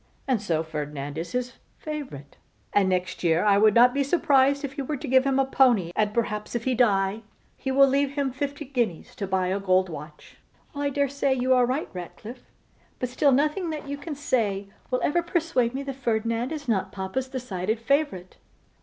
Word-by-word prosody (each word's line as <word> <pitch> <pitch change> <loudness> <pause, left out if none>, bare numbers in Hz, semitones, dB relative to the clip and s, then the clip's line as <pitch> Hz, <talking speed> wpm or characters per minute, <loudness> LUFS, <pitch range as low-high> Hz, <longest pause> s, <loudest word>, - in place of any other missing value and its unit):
And 250 -6 +1
so 165 -6 0
Ferdinand 150 -2 -5
is 170 +1 -6
his 250 0 -3 0.2
favourite; 280 - -7 0.4
and 200 -2 +3
next 185 0 -2
year 170 +2 +2
I 200 -1 +4
should 215 -1 +5
not 245 +1 +6
be 280 - +1
surprised 280 -2 +3
were 280 +1 -3
he - - -8
to 300 - -6
give 260 +1 +4
him 270 -1 +2
a 270 - +3
pony: 245 -10 +3
and 210 -1 +1
perhaps, 210 -1 -2
if 235 - -1
he 260 - +1
die, 205 -3 +2 0.3
he 265 - -5
will 275 +1 +6
leave 275 +1 +1
him 280 -2 -1
fifty 285 +3 -4
guineas 240 - -2
to 200 -4 -3
buy 185 -1 0
a 195 +2 0
gold 185 -1 +2
watch.' 150 -1 -10 0.4
'Well, 285 0 -3
I - - +2
dare 280 0 +1
say 275 0 0
you 260 0 +2
are 250 -1 +4
right, 265 +5 -1
Ratcliffe; 215 +7 -9 0.5
but 250 - -3
still 275 +3 +3
nothing 300 +6 +1
that 305 -2 -5
you 285 - -3
can 295 +1 -6
say 205 -8 -1 0.2
will 255 - 0
ever 345 +4 +2
persuade 325 -8 0
me 275 - -3
that 275 -1 -4
Ferdinand 230 0 -1
is 295 -3 -5
not 190 -4 0
papa's 205 +7 -3
decided 220 -5 -3
favourite. 255 - -1
250 Hz, 200 wpm, -25 LUFS, 195-280 Hz, 0.5 s, not